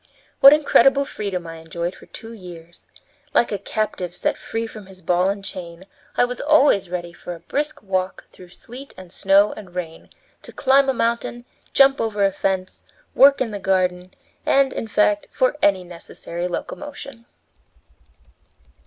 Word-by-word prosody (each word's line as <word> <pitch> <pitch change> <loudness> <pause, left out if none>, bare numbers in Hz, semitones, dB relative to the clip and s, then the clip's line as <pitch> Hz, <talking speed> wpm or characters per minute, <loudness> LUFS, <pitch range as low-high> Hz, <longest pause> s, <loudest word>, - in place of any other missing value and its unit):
What 275 - +10
incredible 280 -2 +4
freedom 195 -8 -4
I 165 0 -8
enjoyed 170 +2 -5
for - - -16
two 225 +1 -10
years! 175 -5 -13 0.5
Like 235 - +3
a 205 - -2
captive 190 -3 -3
set - - -1
free 225 0 -4
from 215 -3 -10
his 190 -1 -14
ball 180 +2 +1
and 200 0 -4
chain, 175 -1 -7 0.3
I - - +5
was 250 0 -5
always 290 - +4
ready 175 -1 -5
for 175 0 -8
a - - -13
brisk 290 - -3
walk 185 -1 -2
through 180 -1 -15
sleet 250 +9 -12
and 185 -2 -12
snow 195 +2 +3
and 185 -4 -12
rain, 165 -3 -6 0.3
to - - -12
climb 270 +1 +3
a - - +2
mountain, 235 +1 -2 0.3
jump 275 0 +5
over 210 -3 0
a 195 - +2
fence, 190 -1 -2 0.3
work 275 0 +6
in 235 -4 -1
the 205 - -5
garden, 185 -1 -1 0.3
and, 275 -1 +3
in 225 - -4
fact, 210 -1 +1
for 255 +3 +1
any 195 -2 +3
necessary 175 0 -7
locomotion. 275 +4 -7
195 Hz, 160 wpm, -21 LUFS, 180-240 Hz, 0.5 s, What